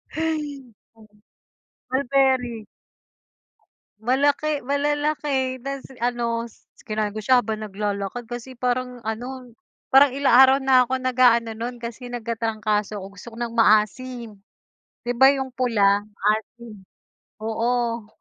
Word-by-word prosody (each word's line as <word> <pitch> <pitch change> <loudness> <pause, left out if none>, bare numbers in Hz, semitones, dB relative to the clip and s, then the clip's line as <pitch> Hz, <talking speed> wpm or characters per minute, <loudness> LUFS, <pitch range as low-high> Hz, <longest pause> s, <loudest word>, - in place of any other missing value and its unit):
Hay. 300 -5 -3 1.2
Mulberry. 260 -4 +1 1.4
Malaki, 285 +5 +1
malalaki 285 -1 -1
na 275 +1 -5 0.2
ano, 235 -1 -1 0.4
kinain 215 -1 -1
ko 215 - -6
siya 250 +3 +3
habang 215 0 -3
naglalakad 205 +2 -4
kasi 240 +2 -7
parang 250 0 -2
ano, 245 +3 -6 0.4
parang 270 0 +6
ilang 275 -4 +3
araw 265 0 +7
na 260 -1 +5
ako 260 - -3
nag-aano 245 -3 +3
nun 240 +2 -4
kasi 235 +2 -7
nagkatrangkaso 220 -3 -2
'ko 190 - -7
gusto 200 +3 -14
ko - - -13
ng 235 -1 -3
maasim. 230 +2 +2 0.8
Di 245 - -1
ba 265 +3 +7
yung 265 -2 -2
pula, 210 -6 +2 0.2
maasim? 215 +1 -2 0.6
Oo. 230 0 -1
245 Hz, 110 wpm, -23 LUFS, 220-265 Hz, 1.4 s, araw